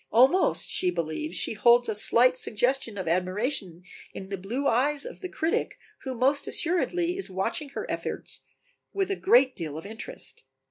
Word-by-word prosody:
Almost 260 Hz, -, +4 dB
she 180 Hz, -, 0 dB
believes 170 Hz, -, -3 dB
she -, -, +1 dB
beholds 240 Hz, +3 st, +4 dB
a 220 Hz, -, -1 dB
slight 240 Hz, +4 st, +4 dB
suggestion 245 Hz, -1 st, -1 dB
of 190 Hz, -, -4 dB
admiration 185 Hz, -, -2 dB, 0.3 s
in 190 Hz, -, -8 dB
the 200 Hz, -, -2 dB
blue 235 Hz, +10 st, -3 dB
eyes 280 Hz, +5 st, +3 dB
of -, -, -9 dB
the 370 Hz, -, -5 dB
critic 325 Hz, -1 st, -1 dB, 0.3 s
who 260 Hz, -1 st, -3 dB
most 270 Hz, +4 st, +2 dB
assuredly 350 Hz, +1 st, 0 dB
is 390 Hz, -, -5 dB
watching 285 Hz, -, -3 dB
her -, -, -3 dB
efforts -, -, -4 dB, 0.5 s
with 395 Hz, 0 st, -1 dB
a -, -, +1 dB
great 380 Hz, -, +4 dB
deal 155 Hz, -3 st, -5 dB
of 160 Hz, -, -8 dB
interest. 225 Hz, -, -8 dB
245 Hz, 170 wpm, -27 LUFS, 195-300 Hz, 0.5 s, Almost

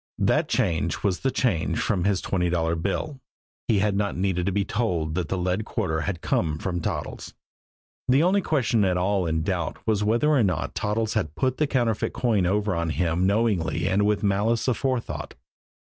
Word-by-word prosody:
That -, -, +2 dB
change 85 Hz, 0 st, 0 dB
was 95 Hz, -3 st, +1 dB
the 135 Hz, -, 0 dB
change 110 Hz, -11 st, 0 dB
from 90 Hz, -3 st, 0 dB
his 100 Hz, -2 st, +1 dB
twenty 90 Hz, -2 st, 0 dB
dollar 85 Hz, -1 st, 0 dB
bill. 100 Hz, -, -3 dB, 0.5 s
He 110 Hz, -, +3 dB
had 100 Hz, 0 st, +1 dB
not 100 Hz, -2 st, -1 dB
needed 90 Hz, -1 st, 0 dB
to -, -, +2 dB
be 100 Hz, +1 st, 0 dB
told 90 Hz, -9 st, -1 dB
that 90 Hz, -2 st, -2 dB
the 95 Hz, -, -1 dB
lead 90 Hz, +4 st, -1 dB
quarter 90 Hz, -9 st, -2 dB
had 90 Hz, -3 st, -3 dB
come 75 Hz, -3 st, 0 dB
from 85 Hz, 0 st, -3 dB
Toddles. -, -, -4 dB, 0.7 s
The 135 Hz, +4 st, +4 dB
only 195 Hz, +3 st, +3 dB
question 125 Hz, -, +1 dB
at 90 Hz, -2 st, +2 dB
all 95 Hz, 0 st, +1 dB
in 80 Hz, -1 st, 0 dB
doubt -, -, -2 dB
was 105 Hz, -2 st, +1 dB
whether 115 Hz, +8 st, +2 dB
or 145 Hz, -4 st, +4 dB
not 90 Hz, -5 st, -1 dB
Toddles 110 Hz, +1 st, -1 dB
had 90 Hz, -9 st, -2 dB
put 130 Hz, -1 st, 0 dB
the 150 Hz, -, +1 dB
counterfeit 120 Hz, -6 st, 0 dB
coin 105 Hz, -7 st, +1 dB
over 105 Hz, +2 st, +1 dB
on 85 Hz, -1 st, -1 dB
him 85 Hz, +2 st, +1 dB
knowingly 100 Hz, -5 st, +1 dB
and 100 Hz, +2 st, +2 dB
with 105 Hz, 0 st, +1 dB
malice 105 Hz, +3 st, +1 dB
aforethought. 130 Hz, -1 st, -2 dB
100 Hz, 190 wpm, -25 LUFS, 90-115 Hz, 0.7 s, The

